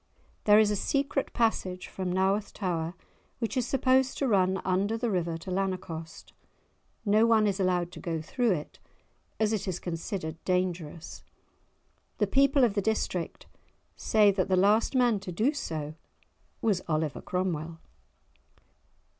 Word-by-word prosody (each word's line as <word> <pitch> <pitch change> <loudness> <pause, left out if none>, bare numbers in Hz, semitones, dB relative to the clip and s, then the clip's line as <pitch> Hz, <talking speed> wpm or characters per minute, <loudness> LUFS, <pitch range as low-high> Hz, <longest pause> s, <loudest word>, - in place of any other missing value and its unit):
There 210 0 +7
is 215 -1 +5
a - - +1
secret 275 +6 -1
passage 190 -6 0
from 185 -2 -4
Naworth 195 +3 +1
tower 175 -3 -2 0.4
which 230 +1 -3
is 255 -2 0
supposed 260 0 +2
to 275 - 0
run 190 -3 +2
under 195 +4 +1
the 235 -1 -1
river 170 -3 -1
to 175 +3 -8
Lanercost. 180 -4 -4 0.7
No 215 +2 +4
one 220 -2 +4
is 200 -1 0
allowed 180 -2 +1
to - - -10
go 165 -2 -3
through 235 - 0
it, 150 -4 -6 0.6
as 220 0 +2
it 210 - -2
is 185 -2 -1
considered 165 -1 -5
dangerous; 180 -3 -2 0.9
the 210 - +2
people 275 +5 +3
of 230 -4 +3
the 200 - 0
district 190 -5 -2 0.5
say 210 -2 +4
that 190 -2 0
the 190 - +2
last 210 +7 +3
man 240 -5 +3
to 195 -1 -7
do 225 - +1
so 155 - -4 0.7
was 205 -5 +2
Oliver 155 -2 -1
Cromwell. 170 -3 -2
190 Hz, 145 wpm, -28 LUFS, 175-220 Hz, 0.9 s, There